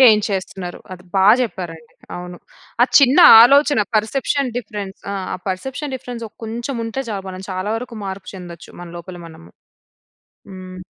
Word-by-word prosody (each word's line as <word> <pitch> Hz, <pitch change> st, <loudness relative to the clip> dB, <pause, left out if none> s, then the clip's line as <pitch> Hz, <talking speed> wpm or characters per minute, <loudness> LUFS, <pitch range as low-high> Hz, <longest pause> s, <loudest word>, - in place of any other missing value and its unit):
Gain 220 Hz, -5 st, +7 dB
చేస్తున్నారు. 190 Hz, -2 st, -5 dB
అది 180 Hz, 0 st, -10 dB
బా 190 Hz, 0 st, +3 dB, 0.2 s
చెప్పారండి. 165 Hz, -8 st, -6 dB, 0.2 s
అవును. 180 Hz, 0 st, -8 dB, 0.4 s
ఆ -, -, +8 dB
చిన్న 275 Hz, +3 st, +4 dB, 0.2 s
ఆలోచన 280 Hz, 0 st, +5 dB
పర్సెప్షన్ 255 Hz, +4 st, 0 dB
డిఫరెన్స్ 205 Hz, -5 st, -6 dB
ఆహ్, 190 Hz, -2 st, -4 dB
పర్సెప్షన్ 265 Hz, +9 st, -4 dB
డిఫరెన్స్. 245 Hz, -2 st, -7 dB
ఆ! -, -, -36 dB
కొంచెం 235 Hz, +4 st, -5 dB
ఉంటే 245 Hz, +4 st, -4 dB
చాలు 195 Hz, -2 st, -4 dB
మనం 185 Hz, +1 st, -8 dB
చాలా 185 Hz, +2 st, -3 dB
వరకు 235 Hz, 0 st, -7 dB
మార్పు 190 Hz, 0 st, -7 dB
చెందొచ్చు. 175 Hz, -2 st, -10 dB
మన 175 Hz, -, -8 dB
లోపల 180 Hz, +1 st, -10 dB
మనము. 165 Hz, 0 st, -14 dB, 1.0 s
హ్మ్. 185 Hz, -1 st, -10 dB
200 Hz, 150 wpm, -19 LUFS, 185-245 Hz, 1.0 s, ఆ